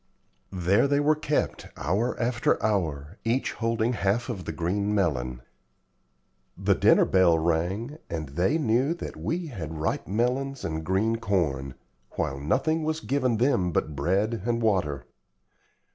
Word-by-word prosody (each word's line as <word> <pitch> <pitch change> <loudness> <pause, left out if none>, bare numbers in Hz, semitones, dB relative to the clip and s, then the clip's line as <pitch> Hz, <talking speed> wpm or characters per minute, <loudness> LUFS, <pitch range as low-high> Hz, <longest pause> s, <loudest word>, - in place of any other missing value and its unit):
There 95 +7 +2
they 140 0 +2
were 150 +1 +3
kept, 150 -1 -1
hour 100 - -1
after 120 0 +1
hour, 85 -5 -1
each 120 +4 0
holding 115 +1 0
half 110 +3 0
of 95 -7 -4
the - - -3
green 100 +6 -1
melon. 65 -10 -1 1.1
The - - +2
dinner - - +5
bell 90 -3 +4
rang, 90 - -1
and 80 -4 -4
they 90 - +1
knew 135 +2 +1
that - - -7
we 175 +2 -2
had 85 - -6
ripe 75 - -2
melons 125 +6 -1
and 80 0 -3
green 100 +7 +1
corn; 75 - -1 0.4
while 70 0 -2
nothing 135 - +1
was 155 0 -1
given 130 -3 0
them 105 -8 +2
but 75 -2 -1
bread 95 +9 0
and 120 +1 0
water. 95 -11 0
100 Hz, 145 wpm, -26 LUFS, 80-125 Hz, 1.1 s, dinner